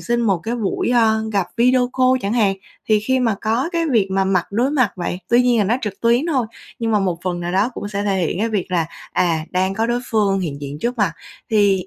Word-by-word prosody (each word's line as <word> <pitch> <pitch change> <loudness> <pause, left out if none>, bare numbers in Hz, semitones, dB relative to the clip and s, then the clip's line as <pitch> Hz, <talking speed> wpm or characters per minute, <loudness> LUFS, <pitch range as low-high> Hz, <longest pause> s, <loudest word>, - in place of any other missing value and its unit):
xin 240 0 0
một 200 -6 +2
cái 225 +8 -4
buổi, 210 -5 -1
ơ, 220 -2 +3
gặp 195 -4 +1
video 250 +1 +3
call 255 0 +3
chẳng 200 - -1
hạn. 210 -5 +2 0.3
Thì 215 -1 +4
khi 260 +4 +1
mà 230 -4 +2
có 230 +7 0
cái 335 -1 0
việc 210 -6 +2
mà 195 0 +1
mặt 190 -2 +1
đối 245 +6 +1
mặt 255 -8 +2
vậy 175 0 -3
tuy 240 +1 +4
nhiên 245 -2 +3
là 210 - +3
nó 220 +5 +1
trực 205 -3 -5
tuyến 235 +6 +2
thôi, 265 -9 0 0.3
nhưng 225 -1 -1
mà 210 - +4
một 180 -4 -1
phần 175 -1 -2
nào 175 +1 -3
đó 200 +6 +2
cũng 205 - -5
sẽ 205 -1 -3
thể 200 -2 0
hiện 170 - -3
cái 225 +3 0
việc 200 -4 -2
là, 170 -3 +1 0.3
à, 165 -3 +1
đang 185 +1 0
có 225 +2 0
đối 240 +1 0
phương 200 -3 +2
hiện 145 -5 -4
diện 145 +1 -6
trước 240 +4 -2
mặt, 190 -6 +2 0.4
thì 200 -4 +3
210 Hz, 260 wpm, -20 LUFS, 190-240 Hz, 0.4 s, Thì